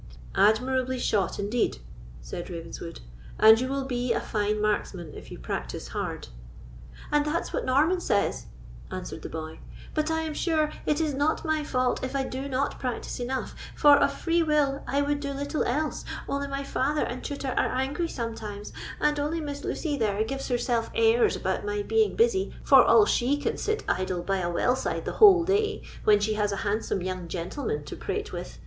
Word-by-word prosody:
"Admirably 255 +5 +2
shot, 210 -5 0
indeed," 210 +4 0 0.5
said 175 - -6
Ravenswood; 165 -1 -7 0.4
"and 220 +2 +8
you 255 - -1
will 275 0 -2
be 245 -1 0
a - - 0
fine 210 0 -1
marksman 195 -6 -1
if - - -10
you - - -8
practise - - -5
hard." - - -4 0.8
"And 295 0 +3
that's 300 +3 -2
what - - -1
Norman 310 +8 +3
says," 205 - 0 0.4
answered - - -6
the - - -6
boy; 160 0 -6 0.3
"but 310 0 0
I 320 0 0
am 315 -1 -3
sure 310 -2 +1 0.2
it 300 0 +2
is 310 -3 0
not 290 +5 0
my 315 -1 +1
fault 255 -4 0
if 260 +1 -3
I 270 - +1
do 265 +1 -4
not 270 +1 -1
practise 250 -1 -4
enough; 255 +1 -3 0.2
for, 290 -1 +7
of 285 - +3
free 340 0 +1
will, 295 -3 +2
I 280 +3 +1
would 290 0 0
do 280 -1 -3
little 285 +2 -2
else, 300 +5 -1 0.2
only 280 0 -2
my 275 0 -3
father 280 +2 0
and 250 - -4
tutor 280 -2 -3
are - - +2
angry 275 +6 -1
sometimes, 220 -6 -6 0.3
and 300 0 +2
only 300 +3 -1
Miss 290 -2 -5
Lucy 295 -4 -2
there 215 -3 +1
gives 270 +4 -4
herself 240 -2 0
airs 230 +1 +4
about 190 0 -2
my 205 0 -2
being 440 - +2
busy, 440 -4 +2
for - - +8
all 425 - +6
she 265 -5 +2
can 290 - -1
sit 435 +1 -1
idle 185 -1 -1
by 195 +2 0
a 175 -2 -1
well 245 +8 +2
side - - -3
the - - -2
whole 385 -5 +9
day, 420 +4 0 0.2
when 210 -1 +6
she 210 +1 0
has 210 -1 0
a - - -1
handsome 205 -2 -1
young 185 -1 -4
gentleman 170 - -3
to 145 - -7
prate - - -4
with. - - -6
260 Hz, 190 wpm, -27 LUFS, 210-295 Hz, 0.8 s, whole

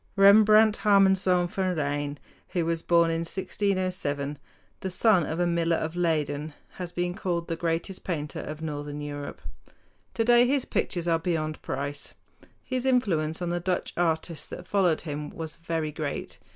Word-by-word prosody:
Rembrandt 215 +2 +7
Harmanzoon 190 -3 +4
van 185 0 -1
Rijn, 145 -1 -2 0.4
who 175 -2 +1
was 165 0 -1
born 170 -1 +3
in 165 - 0
1607, 180 -5 -2 0.4
the 190 - -3
son 185 -1 +3
of 160 - -3
a 175 - +3
miller 170 -1 +1
of 160 +1 -3
Leyden, 155 -3 -1 0.2
has 180 -2 -5
been 175 0 -1
called 175 -4 -2
the 165 - -2
greatest 165 +3 -2
painter 150 -5 -3
of 155 +1 -6
northern 145 -1 -4
Europe. 145 -1 -6 0.7
Today 240 +1 +5
his 275 0 +1
pictures 175 -2 -1
are 165 -1 +3
beyond 155 -2 -2
price. 140 +2 -4 0.5
His 255 0 -2
influence 175 -11 +1
on 175 - -1
the 175 - 0
Dutch 180 +1 -2
artists 165 -2 -1
that - - -8
followed 185 -6 +2
him 150 -2 -5
was 160 -1 -6
very 165 -2 -2
great. 150 -1 -5
170 Hz, 155 wpm, -27 LUFS, 155-185 Hz, 0.7 s, Rembrandt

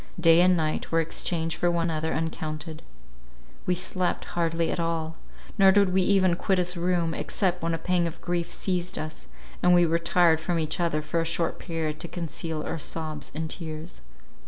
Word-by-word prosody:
Day 165 0 +6
and 180 0 +5
night 155 -1 -1
were 165 - +3
exchanged 165 0 -1
for 175 - +2
one 170 -1 0
another 160 0 -1
uncounted; 155 -1 -4 0.9
we 180 - +3
slept 180 0 -1
hardly 165 -1 0
at - - -2
all, 165 -1 -2 0.4
nor 195 0 +8
did 200 -2 +3
we 190 - +4
even 185 -2 +3
quit 190 +2 0
his 180 0 +1
room, 170 -1 0
except 180 0 -1
when 165 0 0
a - - -3
pang 180 0 +1
of 165 0 -7
grief 175 -1 -2
seized 180 -2 -2
us, 155 0 -6 0.3
and 180 0 +5
we 175 0 +5
retired 165 0 +3
from 170 +2 -1
each 160 +2 -1
other 165 -3 0
for 165 +2 -1
a - - +1
short 165 0 -1
period 160 -3 -3
to - - -4
conceal 165 -2 -4
our 165 - -4
sobs 155 -1 -4
and 160 0 -3
tears. 160 - -7
165 Hz, 185 wpm, -26 LUFS, 160-180 Hz, 0.9 s, nor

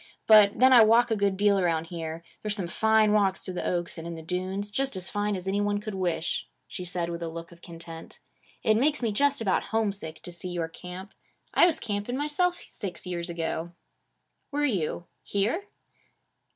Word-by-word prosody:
But 210 -2 +7
then 260 +1 +6
I 240 -3 +9
walk 230 +2 +5
a - - +3
good 200 -2 +1
deal 200 0 +4
around 165 -3 +1
here. 165 -1 -5 0.2
There's 210 -1 -1
some 195 -4 -2
fine 220 +3 +3
walks 195 -2 +2
through 185 - -4
the 180 - -3
oaks 175 -1 -2
and 165 - -7
in 170 - -5
the 160 - -9
dunes; 185 +4 -3
just 270 +2 -1
as 185 -1 -3
fine 205 0 -1
as 185 0 -6
any 200 +1 +1
one 205 0 0
could 210 0 -6
wish,' 175 -3 -1 0.2
she 180 - -6
said 175 -1 -2
with 170 0 -5
a 170 - -2
look 165 +1 -8
of 170 0 -16
content. 165 -1 -10 0.5
'It 215 0 +4
makes 285 +2 +2
me 225 - +1
just 280 +5 +2
about 195 -4 +1
homesick 200 -7 -2
to 175 - -7
see 175 +1 -6
your 170 -2 -2
camp. 180 +3 -9 0.4
I - - +6
was 340 - +1
camping 210 +3 -3
myself 345 +5 0
six 185 -3 -5
years 175 -1 -4
ago.' 170 0 -3 0.8
'Were 295 +1 0
you? 180 - -1 0.2
Here?' 225 - -1
195 Hz, 200 wpm, -27 LUFS, 170-220 Hz, 0.8 s, I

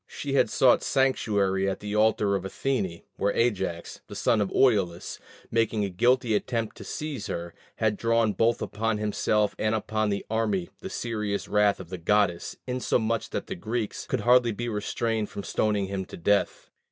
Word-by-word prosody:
She 140 -1 -5
had 140 - +3
sought 130 -2 +4
sanctuary 100 -7 +1
at 95 - -3
the 105 0 -4
altar 105 -2 +3
of 95 - -2
Athene, 95 -4 -2
where 100 0 +1
Ajax, 95 -7 -1
the - - -9
son 110 - +2
of 100 - -1
Oileus, 95 -9 +1 0.3
making 110 -2 +1
a 100 - -4
guilty 120 +5 +2
attempt 115 +1 -1
to - - -8
seize 150 -8 -5
her, 85 0 -5 0.2
had 105 -2 0
drawn 115 -2 +2
both 115 +2 +1
upon 110 +1 -1
himself 105 0 +1
and 110 +1 +1
upon 110 0 -1
the 100 0 -2
army 105 -5 0
the - - -7
serious 105 -4 -3
wrath 105 -1 +3
of 90 -3 -9
the 90 -1 -6
goddess, 90 -1 +1
insomuch 115 -3 0
that - - -3
the - - -5
Greeks 110 +3 -4
could - - -1
hardly 120 -1 +5
be 120 +3 -4
restrained 110 0 -1
from 100 - -6
stoning 105 -1 0
him 95 -1 -4
to - - -10
death. 100 +4 0
105 Hz, 175 wpm, -27 LUFS, 100-115 Hz, 0.3 s, hardly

